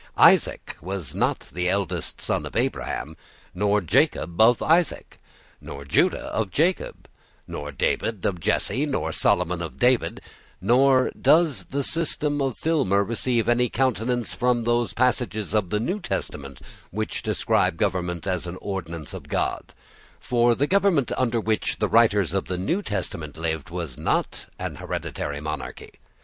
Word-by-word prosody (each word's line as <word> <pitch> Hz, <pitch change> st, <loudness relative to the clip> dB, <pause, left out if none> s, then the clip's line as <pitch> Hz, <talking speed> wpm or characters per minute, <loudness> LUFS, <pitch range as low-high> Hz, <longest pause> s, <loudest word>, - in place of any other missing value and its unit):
Isaac -, -, +4 dB
was 90 Hz, -3 st, -4 dB
not -, -, -1 dB
the 90 Hz, +2 st, 0 dB
eldest 90 Hz, -3 st, -2 dB
son -, -, -1 dB
of -, -, -11 dB
Abraham, 80 Hz, -, -2 dB, 0.4 s
nor 105 Hz, +2 st, +2 dB
Jacob 85 Hz, +1 st, +1 dB
of 115 Hz, +2 st, +6 dB
Isaac, 165 Hz, +1 st, +1 dB, 0.4 s
nor 70 Hz, 0 st, -8 dB
Judah 70 Hz, -, +1 dB
of 110 Hz, -3 st, 0 dB
Jacob, 170 Hz, -, -1 dB, 0.4 s
nor 75 Hz, 0 st, -6 dB
David 95 Hz, -, -1 dB
of 90 Hz, -3 st, 0 dB
Jesse 135 Hz, -, 0 dB
nor 135 Hz, -, -1 dB
Solomon 90 Hz, +1 st, +1 dB
of 85 Hz, -, -6 dB
David 125 Hz, 0 st, +2 dB, 0.4 s
Nor 130 Hz, +1 st, +4 dB
does 155 Hz, -, +3 dB
the 140 Hz, +1 st, -2 dB
system 150 Hz, -2 st, 0 dB
of 135 Hz, -4 st, -1 dB
Filmer 135 Hz, -, +2 dB
receive 115 Hz, +2 st, 0 dB
any 120 Hz, 0 st, +3 dB
countenance 120 Hz, -2 st, 0 dB
from 125 Hz, -1 st, +1 dB
those 120 Hz, -3 st, +1 dB
passages 115 Hz, -4 st, 0 dB
of 105 Hz, -5 st, +1 dB
the 105 Hz, -, 0 dB
New 180 Hz, -, -1 dB
Testament 70 Hz, -, -5 dB, 0.3 s
which 110 Hz, +3 st, -3 dB
describe 80 Hz, -, +1 dB
government 90 Hz, -4 st, -1 dB
as 90 Hz, -2 st, -2 dB
an 85 Hz, +1 st, -6 dB
ordinance 85 Hz, -6 st, -5 dB
of -, -, -8 dB
God: -, -, -2 dB, 0.5 s
for 120 Hz, -1 st, +2 dB
the 140 Hz, -, +1 dB
government 190 Hz, -6 st, +2 dB
under 120 Hz, -2 st, +1 dB
which 110 Hz, -1 st, -1 dB
the -, -, +1 dB
writers 105 Hz, -6 st, +3 dB
of 95 Hz, -, 0 dB
the 90 Hz, -, -3 dB
New 165 Hz, -, 0 dB
Testament 90 Hz, -, -4 dB
lived 80 Hz, -2 st, -3 dB
was 85 Hz, -7 st, -5 dB
not -, -, -1 dB
a -, -, -4 dB
hereditary 70 Hz, 0 st, -4 dB
monarchy. 75 Hz, -1 st, -6 dB
105 Hz, 150 wpm, -24 LUFS, 90-125 Hz, 0.5 s, of